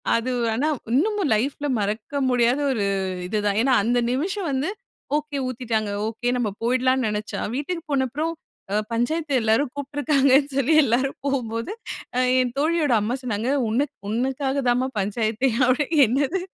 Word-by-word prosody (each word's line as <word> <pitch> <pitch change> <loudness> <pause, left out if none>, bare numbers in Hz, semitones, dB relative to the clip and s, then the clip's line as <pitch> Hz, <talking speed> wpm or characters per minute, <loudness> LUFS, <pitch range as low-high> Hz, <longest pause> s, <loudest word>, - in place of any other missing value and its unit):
அது 240 +2 -1 0.2
ஆனா 285 +7 0 0.3
இன்னமும் 395 - +1
லைஃப்ல 280 +6 -1
மறக்க 215 +8 -2
முடியாத 245 +2 +3
ஒரு 215 -5 0 0.4
இது 210 +3 -1
தான். 200 0 +1
ஏன்னா 260 +1 +3
அந்த 245 +1 +2
நிமிஷம் 355 +7 -1
வந்து 270 +5 -1 0.5
"ஒகே 295 -1 -4
ஊத்திட்டாங்க" 225 -4 -2 0.2
ஒகே 240 +2 -2
நம்ம 235 -4 0
போய்டலாம்னு 255 +2 +2
நெனச்சா, 210 0 -4 0.2
வீட்டுக்கு 330 +5 -3
போன 275 -2 +2
அப்புறம் 310 +5 -2 0.4
அ - - +1 0.2
"பஞ்சாயத்த 300 +6 -1
எல்லாரும்" 225 +6 +2
கூப்பிட்டிருக்காங்கனு 285 -1 +2
சொல்லி 275 +3 +2
எல்லாரும் 260 +2 +1
போகும்போது 235 - -2 0.7
என் 250 -1 +1
தோழியோட 310 -1 +1
அம்மா 220 +4 -1
சொன்னாங்க, 230 -1 -2 0.2
"உன்னக் 265 +6 0 0.2
உன்னக்காக 265 +4 -1
தான்மா 250 +2 +2
பஞ்சாயத்தே!" 220 +5 0 0.2
அப்படினு, 265 +4 +1 0.2
"என்னது? 280 - 0
260 Hz, 140 wpm, -23 LUFS, 230-285 Hz, 0.7 s, முடியாத